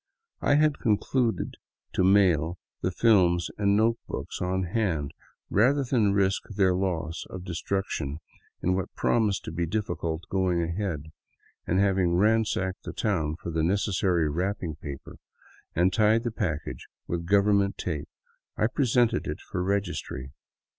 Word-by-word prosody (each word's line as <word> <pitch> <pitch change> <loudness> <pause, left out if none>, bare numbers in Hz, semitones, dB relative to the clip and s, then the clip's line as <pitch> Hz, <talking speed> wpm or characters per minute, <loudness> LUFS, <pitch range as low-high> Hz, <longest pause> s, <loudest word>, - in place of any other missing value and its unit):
I 145 - +3
had 150 -1 +3
concluded 115 +2 0 0.4
to - - +2
mail 90 -4 +4 0.2
the - - +1
films 90 -4 +3
and 100 -1 +3
notebooks 115 +2 -1
on 95 +1 0
hand, 85 -7 -1 0.4
rather 135 +7 +4
than 115 -6 +2
risk 100 -1 +2
their 95 -3 +2
loss 85 -4 -2
or - - -6
destruction 90 -4 -3 0.5
in 90 - +2
what 95 0 -3
promised 105 -4 +1
to - - -5
be 85 +1 -2
difficult 85 -4 -2
going 90 -3 +1
ahead, 85 -3 -3 0.6
and 95 - +2
having 95 -3 +2
ransacked 105 -2 +1
the - - -7
town 80 -8 0
for 85 +1 -6
the 80 0 0
necessary 95 -2 +1
wrapping 85 +1 -2
paper, 70 -3 -8 0.6
and 90 +2 +3
tied 110 +3 +3
the 120 - -2
package 90 -9 -3 0.2
with 85 -1 -3
government 100 0 +3
tape, 75 -5 -4 0.5
I - - +2
presented 120 -1 +2
it 75 - -4
for - - -4
registry. 90 -9 -2
95 Hz, 140 wpm, -27 LUFS, 85-105 Hz, 0.6 s, mail